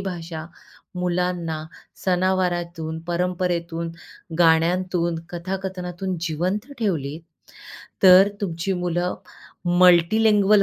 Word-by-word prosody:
भाषा 165 -4 -5 0.5
मुलांना 180 -3 -2 0.4
सनावारातून, 175 -3 0
परंपरेतून, 170 -1 -2 0.5
गाण्यांतून, 170 +1 +2
कथाकथनातून 185 0 -4
जिवंत 185 - -2
ठेवली 160 - -1 0.8
तर 190 +1 +8
तुमची 175 0 -2
मुलं 180 0 -1 0.7
मल्टीलिंग्वल 200 +3 +5
180 Hz, 70 wpm, -23 LUFS, 170-185 Hz, 0.8 s, तर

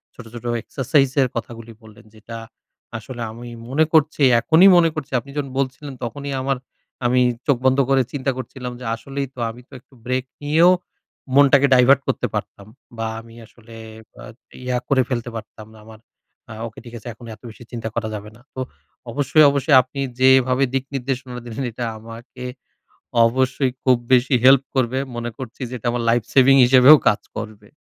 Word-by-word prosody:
ছোট, 125 - -11
ছোট 120 0 -9 0.2
এক্সারসাইজ 135 +1 +1
এর 130 - +3
কথাগুলি 115 0 -7
বললেন। 110 +1 -16
যেটা 115 +1 -10 0.6
আসলে 120 +2 -9
আমি 120 +2 -10 0.2
মনে 150 +5 +2
করছি, 155 -1 +2 0.2
এখনই 165 +9 +6
মনে 165 -1 +4
করছি, 150 -3 -6
আপনি 140 +4 -13
যখন 140 -2 -3
বলছিলেন, 135 +1 -4
তখনই 140 +4 -5
আমার 135 0 -1 0.5
আমি 125 +1 +3 0.3
চোখ 140 -4 +3
বন্ধ 130 0 +4
করে 135 -1 +4
চিন্তা 135 -1 -1
করছিলাম, 125 0 -7
যে 125 - -9
আসলেই 135 +4 -5
তো, 130 - -13
আমি 120 +2 -10
তো - - -19
একটু 125 - -30
ব্রেক 130 +1 -1 0.2
নিয়েও, 160 +5 +5 0.6
মনটাকে 140 0 +5
divert 130 +2 +5
করতে - - -1
পারতাম। 100 - -6 0.3
বা 115 0 -2
আমি 115 0 -16
আসলে 115 0 -17 0.5
আ - - -10 0.4
ইয়া 125 -1 0
করে 135 -2 +3
ফেলতে 120 -2 -3
পারতাম 110 0 -9
না। - - -16
আমার 110 -1 -14 0.5
আ - - -7
ওকে, 110 - -12
ঠিক 120 - -11
আছে, 115 - -12
এখন 120 +2 -15
এত 105 - -30
বেশি 110 - -13
চিন্তা 115 -2 -5
করা 115 -2 -2
যাবে 105 0 -8
না। - - -21
তো - - -6 0.5
অবশ্যই, 145 +4 +3
অবশ্যই 140 +1 +2
আপনি 130 +2 -10 0.2
যেভাবে 130 0 +4
দিক 135 0 -1
নির্দেশনা 130 -1 -4
দিলেন, 120 +3 -5
এটা 120 +2 -5
আমাকে 115 +3 -11 0.8
অবশ্যই 130 +2 0
খুব 130 -2 +4 0.2
বেশি 130 +2 +3
হেল্প 135 0 +7
করবে। 130 0 0 0.2
মনে 120 0 -4
করছি 130 -1 -9
যে, 125 - -9
এটা 120 +1 -5
আমার 120 0 -2
life 115 -2 +1
saving 135 0 +6
হিসেবেও 130 +4 +8
কাজ 105 - +2 0.2
করবে। 105 -1 -8
125 Hz, 180 wpm, -21 LUFS, 115-135 Hz, 0.8 s, হিসেবেও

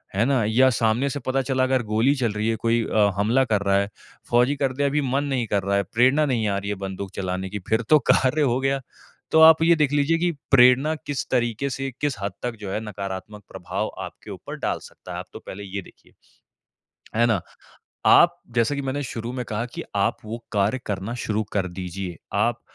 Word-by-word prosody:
है 105 +4 +3
ना? 130 -3 +2
या 125 +5 +4
सामने 115 +3 +1
से 145 - -4
पता 130 +1 +1
चला 130 -1 0
अगर 130 -1 +1
गोली 115 +6 +3
चल 120 -5 0
रही 105 +2 -1
है, 115 - +1
कोई 115 +1 +1
अ, 105 -2 +3
हमला 115 +6 +3
कर 105 -4 +1
रहा 100 0 +2
है, 100 0 0 0.4
फौजी 125 +4 +3
कर 135 -2 -1
दिया 140 +2 0
अभी 145 +2 +1
मन 135 +1 0
नहीं 130 -5 -1
कर 100 -2 0
रहा 100 +1 0
है, 100 - +1
प्रेरणा 130 +6 +4
नहीं 120 -6 0
आ 100 -1 0
रही 100 +1 -4
है 105 - -1
बंदूक 95 0 -6
चलाने 95 0 -3
की 105 +2 -5
फिर 110 +1 +2
तो 155 - +7
कार्य 135 +4 +2
हो 130 -3 +2
गया। 135 0 0 0.5
तो 160 - +5
आप 160 0 +8
ये 170 +1 +5
देख 150 -3 +1
लीजिए 145 +3 +2
कि 175 +1 +1 0.2
प्रेरणा 130 +4 +6
किस 145 0 -3
तरीके 120 +2 0
से, 135 +1 -4
किस 145 -3 0
हद 100 -1 -3
तक 120 -1 -2
जो 100 -2 -5
है 105 - -1
नकारात्मक 100 0 -6
प्रभाव - - -4
आपके - - -10
ऊपर - - -8
डाल - - -1
सकता - - -12
है, - - -5
आप - - -7
तो - - -8
पहले 100 +2 -7
ये 100 0 -5
देखिए। - - -20 1.1
है 120 - +5
ना? 110 -6 +1 0.7
आप - - +6 0.2
जैसा 115 +4 +2
कि 140 - -3
मैंने 135 +2 -2
शुरू 115 -1 -5
में 125 -1 -4
कहा 110 +1 -2
कि - - -4
आप 100 - +1
वो 115 +2 -7
कार्य 105 +4 +1
करना 105 +3 -3
शुरू 110 0 0
कर 100 -2 0
दीजिए। 90 0 -6 0.2
आप - - +1
120 Hz, 225 wpm, -24 LUFS, 105-135 Hz, 1.1 s, आप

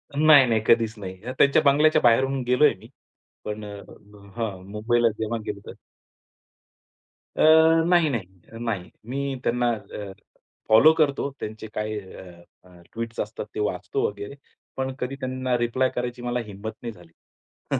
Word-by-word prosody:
नाही, 150 -2 +7
नाही. 110 -2 +1
कधीच 115 -2 +3
नाही. 95 -2 -7 0.2
त्यांच्या 140 0 +5
बंगल्याच्या 155 +2 +4
बाहेरून 130 +3 +3
गेलोय 135 +4 +4
मी. 110 - -14 0.6
पण 105 0 -5
अ 100 0 -8 0.6
हां, 105 -6 -4
मुंबईला 115 +2 +2
जेव्हा 110 +1 -2
गेलतो. 100 -1 -7 1.6
अ, - - -1 0.5
नाही, 175 -3 +4
नाही, 115 -9 -3 0.3
नाही. 110 -7 -3 0.2
मी 140 +1 -2
त्यांना 120 0 +1
अ, 105 -2 -7 0.6
फॉलो 115 +9 +7
करतो. 145 -3 +1
त्यांचे 110 +1 -7
काय 105 0 -3
अ, 95 -2 -13 0.2
अ, 90 -1 -18
ट्वीट्स 115 0 -5
असतात 105 0 -4
ते - - -3
वाचतो 105 - -1
वगैरे, 105 +5 -7 0.4
पण 130 0 -2
कधी 125 +2 -3
त्यांना 130 -1 -1
रिप्लाय 120 +2 +1
करायची 125 0 -4
मला 120 0 -2
हिम्मत 105 +1 -7
नाही 120 - -5
झाली. 85 -4 -18 0.6
हं. - - +1
115 Hz, 145 wpm, -24 LUFS, 105-130 Hz, 1.6 s, नाही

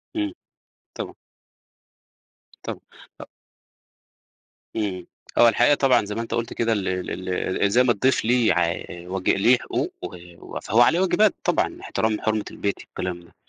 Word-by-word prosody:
إمم، 100 -3 -1 0.7
طبعًا. - - -5 1.5
طبعًا - - -5 0.4
أ - - -8 1.5
إمم، 95 -5 -3 0.3
هو 120 - +8
الحقيقة 120 +5 +4
طبعًا 125 -6 +3
زي 105 - -5
ما 115 - -2
أنت 115 - -5
قُلت 115 0 -2
كده 115 -1 +1
ال 100 -3 -2
ال 90 0 -3 0.3
ال 100 - +3
زي 125 +3 +5
ما 125 - +3
الضيف 120 +3 +1
ليه 120 -4 +3
ع 85 0 +1
واج 90 +2 -4
ليه 120 +6 +5
حقوق - - -3
و 85 -1 -8
فهو 115 +3 +2
عليه 160 +8 +5
واجبات، 200 +2 +3
طبعًا، - - 0
احترام 110 -1 -1
حُرمة 110 -1 0
البيت 100 - -2
والكلام 90 -1 -5
ده. 85 - -21
105 Hz, 150 wpm, -24 LUFS, 90-120 Hz, 1.5 s, هو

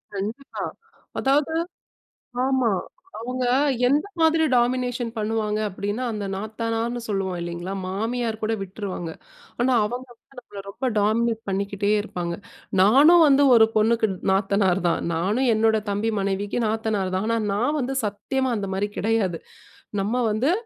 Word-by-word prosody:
கண்டிப்பா. 220 +8 -5 0.6
அதாவது 285 +3 +2 0.9
ஆமா. 260 -4 +2 0.5
அவுங்க 250 +3 -3 0.4
எந்த 290 +7 +2
மாதிரி 320 0 +4
டாமினேஷன் 245 0 +1
பண்ணுவாங்க 215 0 -1
அப்பிடின்னா, 205 +5 -3
அந்த 210 -2 -4
நாத்தனார்ன்னு 225 +3 -3
சொல்லுவோம் 195 -3 -2
இல்லேங்களா! 175 +2 -5
மாமியார் 225 +3 -2
கூட 220 +1 0
விட்டுருவாங்க. 190 -3 -5 0.5
ஆனா, 255 +2 +3
அவங்க 245 +4 -5
வந்து 255 +3 -27
நம்மள 205 -4 -10
ரொம்ப 260 +6 -2
டாமினேட் 225 +2 +1
பண்ணிக்கிட்டே 200 +1 -1
இருப்பாங்க. 175 -4 -4 0.5
நானும் 295 - +7
வந்து 280 0 +5
ஒரு 220 -1 +7
பொண்ணுக்கு 220 +1 +3 0.2
நாத்தனார் 195 -1 +2
தான். 170 - +1
நானும் 210 +10 +1
என்னோட 220 0 +3
தம்பி 205 +3 0
மனைவிக்கு 200 +3 -1
நாத்தனார் 215 -4 -1
தான். 190 +3 -1
ஆனா 230 0 +1 0.2
நான் 245 +9 +1
வந்து 265 +1 -2
சத்தியமா 260 +6 -2
அந்த 200 -1 -3
மாதிரி 200 +2 -1
கிடையாது. 200 -6 0 0.6
நம்ம 210 +4 -1 0.2
வந்து 240 +8 +1
220 Hz, 130 wpm, -24 LUFS, 200-245 Hz, 0.9 s, நானும்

